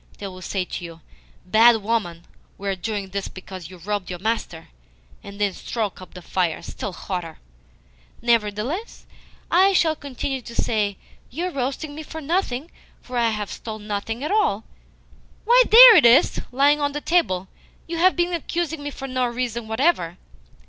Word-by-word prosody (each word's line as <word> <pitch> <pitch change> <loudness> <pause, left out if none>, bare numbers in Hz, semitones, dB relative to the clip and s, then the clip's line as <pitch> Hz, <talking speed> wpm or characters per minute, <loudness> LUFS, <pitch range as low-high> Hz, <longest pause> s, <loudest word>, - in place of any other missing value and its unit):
They 205 - -7
will 185 -1 -8
say 185 0 -2
to 180 - -6
you, 165 -1 -9 0.4
'Bad 225 +3 +5
woman, 190 -7 -2 0.3
we 200 - -7
are 195 - 0
doing 200 +1 -4
this 200 0 -4
because 185 -3 -9
you 185 - -12
robbed 200 +2 -4
your 180 - -4
master,' 185 -5 -3 0.5
and 200 0 -10
then 205 -2 +1
stoke 215 -3 -4
up 185 - -13
the 180 - -10
fire 175 -2 -1
still 205 - -6
hotter." 175 -3 -6 0.8
"Nevertheless 235 - -1 0.5
I 380 +3 +5
shall 320 -4 +3
continue 270 -2 -4
to 235 0 -11
say, 205 -3 0 0.3
'You 340 +8 -3
are - - -10
roasting 280 +2 -3
me 310 - -7
for 320 +1 -8
nothing, 315 -2 -2 0.3
for 250 - -10
I 235 -1 +2
never 210 -2 -4
stole 220 -1 -7
anything 210 +4 -4
at 300 - -2
all.' 405 - +1 0.8
Why, 485 +3 +6
THERE 470 +1 +11
it - - +5
is, 235 +2 +4
lying 285 +3 +3
on 285 0 0
the 295 - -4
table! 195 - +1 0.4
You 335 0 -5
have 370 +3 +4
been 350 0 0
accusing 335 -1 -3
me 290 - -4
for 270 -1 -7
no 255 -1 0
reason 235 -1 -3
whatever!" 220 - 0
230 Hz, 175 wpm, -23 LUFS, 195-295 Hz, 0.8 s, THERE